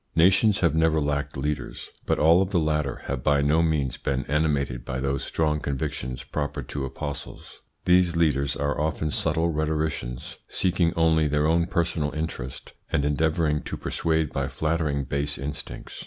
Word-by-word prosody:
Nations 95 +5 +4
have 85 -4 +3
never 80 0 +3
lacked 75 -1 -1
leaders, 75 0 -4 0.2
but - - +2
all 85 +4 +5
of 95 - 0
the 100 - +1
latter 75 -5 0
have 70 -2 -3
by 70 -1 +3
no 75 +3 +3
means 75 -5 0
been 65 0 -2
animated 70 -4 0
by 65 +1 -4
those 70 +1 -1
strong 75 -1 0
convictions 65 -2 -3
proper 70 0 -3
to 70 +2 -4
apostles. 70 +2 -7 0.3
These 90 -1 +4
leaders 70 -4 +2
are 70 +1 -1
often 80 0 -1
subtle 80 +3 +1
rhetoricians, 75 -5 -2
seeking 90 -2 +1
only 80 -1 +3
their 75 +1 +1
own 85 +2 +3
personal 80 -4 0
interest, 75 -5 -5 0.2
and 70 - +1
endeavouring 75 +1 +1
to - - -5
persuade 80 -2 0
by - - -1
flattering 75 -3 -1
base 70 +2 -1
instincts. 75 +1 -6
75 Hz, 160 wpm, -25 LUFS, 70-80 Hz, 0.3 s, all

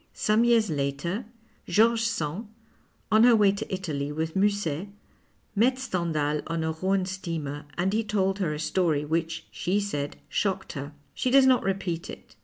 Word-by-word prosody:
Some 215 +2 +2
years 230 -5 +3
later 145 - -2 0.4
George 225 +1 +4
Sand, 210 -3 -2 0.6
on 220 +1 +6
her 240 -1 +7
way 205 -2 +5
to 200 +2 -5
Italy 155 -7 -3
witli 160 +1 -3
Musset, 195 -4 0 0.7
met 250 +5 +3
Stendhal 160 - -1
on 165 0 -2
a 160 - 0
Rhone 190 +4 0
steamer, 165 -6 -4
and 185 +3 +1
he 225 +1 +1
told 200 -2 0
her 175 -6 0
a 150 - -3
story 155 -2 +1
which, 165 +1 -2
she 190 +4 0
said, 145 -8 -3
shocked 195 -2 -1
her. 140 0 -6 0.2
She 255 - -1
docs 270 +1 +6
not 260 -1 +5
repeat 190 -4 -2
it. - - -11
185 Hz, 165 wpm, -27 LUFS, 160-210 Hz, 0.7 s, her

